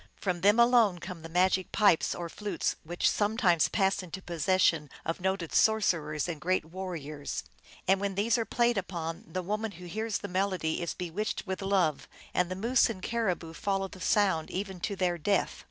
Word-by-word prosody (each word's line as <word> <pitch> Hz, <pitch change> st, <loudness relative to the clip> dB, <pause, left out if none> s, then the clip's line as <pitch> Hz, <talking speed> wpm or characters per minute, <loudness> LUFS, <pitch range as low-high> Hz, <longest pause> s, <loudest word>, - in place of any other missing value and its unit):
From 180 Hz, -3 st, -2 dB
them 205 Hz, +5 st, +5 dB
alone 235 Hz, -6 st, +5 dB
come 175 Hz, -1 st, -8 dB
the 165 Hz, -, -9 dB
magic 185 Hz, +2 st, +2 dB
pipes 205 Hz, -6 st, +3 dB
or 175 Hz, -1 st, -4 dB
flutes, 205 Hz, +4 st, -2 dB
which 175 Hz, +2 st, 0 dB
sometimes 205 Hz, -5 st, +3 dB
pass 195 Hz, -1 st, +1 dB
into 185 Hz, +1 st, -7 dB
possession 170 Hz, -3 st, +1 dB, 0.2 s
of 165 Hz, -, -2 dB
noted 190 Hz, -3 st, -1 dB
sorcerers 170 Hz, -9 st, +2 dB
and 160 Hz, -4 st, -5 dB
great 185 Hz, 0 st, +1 dB
warriors; 160 Hz, -5 st, -5 dB, 0.4 s
and 190 Hz, +1 st, +3 dB
when 200 Hz, -1 st, -1 dB
these 210 Hz, +3 st, +2 dB
are 235 Hz, -, +1 dB
played 235 Hz, -1 st, +1 dB
upon, 170 Hz, -3 st, -5 dB
the 185 Hz, +2 st, -2 dB
woman 210 Hz, +3 st, -2 dB
who 180 Hz, +1 st, -11 dB
hears 220 Hz, +4 st, -2 dB
the 205 Hz, -, -6 dB
melody 185 Hz, -4 st, -1 dB
is 170 Hz, -, -3 dB
bewitched 180 Hz, +6 st, -3 dB
with 190 Hz, 0 st, -4 dB
love, 190 Hz, -7 st, +1 dB, 0.3 s
and 180 Hz, -1 st, +1 dB
the 185 Hz, -, -3 dB
moose 235 Hz, +7 st, +3 dB
and 190 Hz, -5 st, -6 dB
caribou 185 Hz, -8 st, -1 dB
follow 195 Hz, +1 st, -1 dB
the 185 Hz, -1 st, -13 dB
sound 185 Hz, -5 st, +2 dB
even 190 Hz, -1 st, -4 dB
to 200 Hz, +3 st, -2 dB
their 180 Hz, -2 st, 0 dB
death. 200 Hz, +6 st, 0 dB
185 Hz, 185 wpm, -29 LUFS, 170-205 Hz, 0.4 s, them